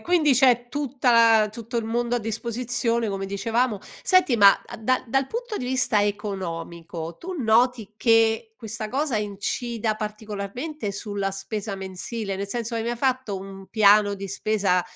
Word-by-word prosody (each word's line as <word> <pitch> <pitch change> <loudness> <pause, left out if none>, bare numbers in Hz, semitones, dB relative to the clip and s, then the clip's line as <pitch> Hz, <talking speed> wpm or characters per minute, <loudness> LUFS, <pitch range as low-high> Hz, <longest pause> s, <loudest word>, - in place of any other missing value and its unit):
quindi 310 0 +3
c'è 245 -2 +4
tutta 275 -3 0 0.3
la 210 - 0
tutto 230 +2 -6
il 230 - 0
mondo 235 +2 -1
a - - +1
disposizione, 235 +1 -2
come 195 0 -3
dicevamo. 225 +3 0 0.2
Senti, 370 -8 +4
ma 200 -3 +8
a - - -9
da 255 +4 0
dal 270 +3 +1
punto 470 - -4
di 250 - -4
vista 250 -4 +2
economico 170 -5 -4
tu 370 +2 -6
noti 230 -2 +2
che 225 -1 +3
questa 220 -2 -6
cosa 270 -1 0
incida 215 +2 -2
particolarmente 215 +5 -5
sulla 200 -1 -3
spesa 200 +1 -4
mensile? 195 +2 -5
Nel 200 +1 -4
senso 235 +1 -3
hai 225 - -1
mai 240 +1 -2
fatto 255 -4 0
un 195 0 -9
piano 210 -1 +5
di 195 0 -6
spesa, 195 -2 +1
220 Hz, 155 wpm, -24 LUFS, 200-245 Hz, 0.3 s, ma